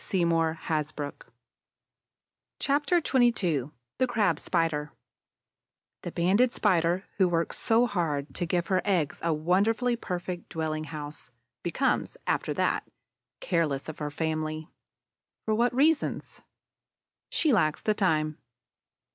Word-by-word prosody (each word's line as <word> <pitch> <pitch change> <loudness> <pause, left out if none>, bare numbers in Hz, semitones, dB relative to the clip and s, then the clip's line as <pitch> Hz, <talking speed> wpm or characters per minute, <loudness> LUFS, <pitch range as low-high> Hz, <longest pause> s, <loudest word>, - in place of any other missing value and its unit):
CHAPTER 295 +5 +2
XXII 195 - +2 0.3
THE 255 - +3
CRAB 225 -4 +1
SPIDER 160 -4 0 1.1
The - - -5
Banded 200 +9 +3
Spider, 180 -4 +2
who 190 -3 +4
works 170 -1 -1
so 230 +2 +4
hard 155 -9 -2
to 175 - -2
give 175 0 0
her 185 -1 +1
eggs 175 -8 0
a 170 - +2
wonderfully 200 +10 +2
perfect 180 -5 -5
dwelling 155 -1 -2
house, 150 -2 -7 0.3
becomes, 265 - 0
after - - 0
that, - - 0 0.5
careless 155 - 0
of 160 - -7
her 150 -1 -2
family. 155 +1 -3 0.8
For 220 - +1
what 235 +3 +3
reasons? 300 +3 +1 0.9
She 310 -6 +2
lacks 155 -8 +2
the 215 - +2
time. 155 -7 +1
175 Hz, 110 wpm, -28 LUFS, 155-225 Hz, 1.1 s, who